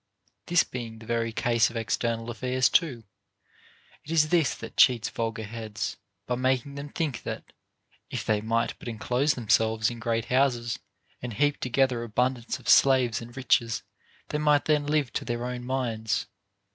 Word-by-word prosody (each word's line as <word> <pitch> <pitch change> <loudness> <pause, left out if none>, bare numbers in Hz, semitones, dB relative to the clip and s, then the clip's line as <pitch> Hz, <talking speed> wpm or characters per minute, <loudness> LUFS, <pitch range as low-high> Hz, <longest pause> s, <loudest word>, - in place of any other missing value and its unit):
This 175 0 +4
being 115 -3 -7
the 115 - -12
very 115 0 -1
case 115 0 +2
of 120 - -12
external 115 +1 -1
aifairs 125 +2 0
too, 135 -10 +2 1.0
it - - -14
is 155 -2 +3
this 160 -6 +2
that - - -9
cheats 120 -4 +5
vulgar 115 -1 -3
heads, 110 -1 -5 0.3
by 125 - -1
making 130 +2 0
them 140 +1 -7
think 150 -5 -2
that, - - -7 0.6
if - - -4
they 105 -1 +1
might 115 +1 0
but - - -10
enclose 125 +6 0
themselves 110 -1 +2
in 120 - -8
great 115 -1 -1
houses 125 -3 +1 0.4
and 120 -2 -5
heap 145 +7 +1
together 125 -1 +1
abundance 120 +2 -1
of - - -14
slaves 130 -4 +5
and 120 +2 -11
riches, 115 -3 +1 0.5
they 150 - -1
might 150 -1 +3
then 150 -2 +2
live 145 -6 +1
to - - -2
their 120 -1 -3
own 125 0 -4
minds. 115 -5 -1
120 Hz, 165 wpm, -27 LUFS, 115-135 Hz, 1.0 s, cheats